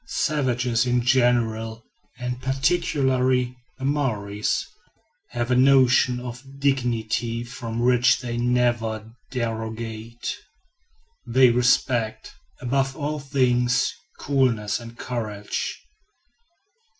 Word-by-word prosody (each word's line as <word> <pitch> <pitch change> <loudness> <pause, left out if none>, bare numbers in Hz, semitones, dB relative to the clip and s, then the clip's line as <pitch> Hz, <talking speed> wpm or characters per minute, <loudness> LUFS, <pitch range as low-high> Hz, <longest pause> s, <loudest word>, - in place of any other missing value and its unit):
Savages 125 -5 0
in 125 0 +2
general, 115 -3 +1 0.3
and 125 0 -4
particularly 130 -3 +1 0.2
the 130 - -5
Maories, 105 -8 -1 0.6
have 120 0 -2
a - - +4
notion 130 -1 +5
of 125 0 -7 0.2
dignity 120 -4 0
from 120 -2 -6
which 120 0 +4
they 120 -1 -4
never 120 -2 0 0.2
derogate. 115 -1 -4 0.9
They 125 +1 +5
respect, 120 -2 +1 0.3
above 135 +1 0
all 150 0 -2
things, 125 -2 +1 0.2
coolness 120 -7 +1
and 115 0 -11
courage. 110 -4 -4
125 Hz, 90 wpm, -24 LUFS, 115-130 Hz, 0.9 s, notion